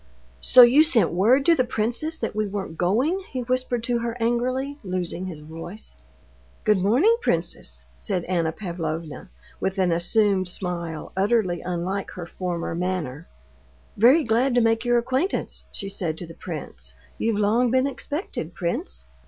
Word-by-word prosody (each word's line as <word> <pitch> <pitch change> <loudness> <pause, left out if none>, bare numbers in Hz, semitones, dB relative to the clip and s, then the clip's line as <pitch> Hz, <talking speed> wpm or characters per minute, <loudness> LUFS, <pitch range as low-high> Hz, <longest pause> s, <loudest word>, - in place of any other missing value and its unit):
"So 250 0 +8
you 250 +5 +7
sent 300 -8 +4
word 235 +10 +3
to 340 - +6
the 255 - +2
princess 245 +8 -2
that - - -4
we 215 -1 0
weren't 195 -4 -5
going!" 240 - +1
he 255 - -3
whispered 250 -1 -1
to 240 -1 0
her 235 0 -3
angrily, 255 +5 -1
losing 185 -1 -3
his 160 -5 -7
voice. 165 - -9 0.7
"Good 210 -2 +3
morning, 255 - +4
princess," - - -2
said 185 -5 -3
Anna 170 -3 0
Pavlovna, 165 -2 -5 0.3
with 190 +1 -2
an 185 -2 +2
assumed 190 +2 +2
smile 170 -3 -5
utterly 190 -3 +1
unlike 180 +3 -3
her 175 - -6
former 175 -1 -4
manner. 170 -4 -3 0.7
"Very 260 +9 +6
glad 240 +3 +2
to - - +5
make 225 0 +2
your 240 0 +3
acquaintance," 260 +10 -1
she 195 - -5
said 175 -5 -3
to 175 - -6
the 165 - -11
prince. 65 - -8 0.2
"You've 225 -2 +1
long 225 +4 +3
been 260 +2 +3
expected, 280 - -4
prince." 195 - -3
205 Hz, 155 wpm, -24 LUFS, 175-245 Hz, 0.7 s, So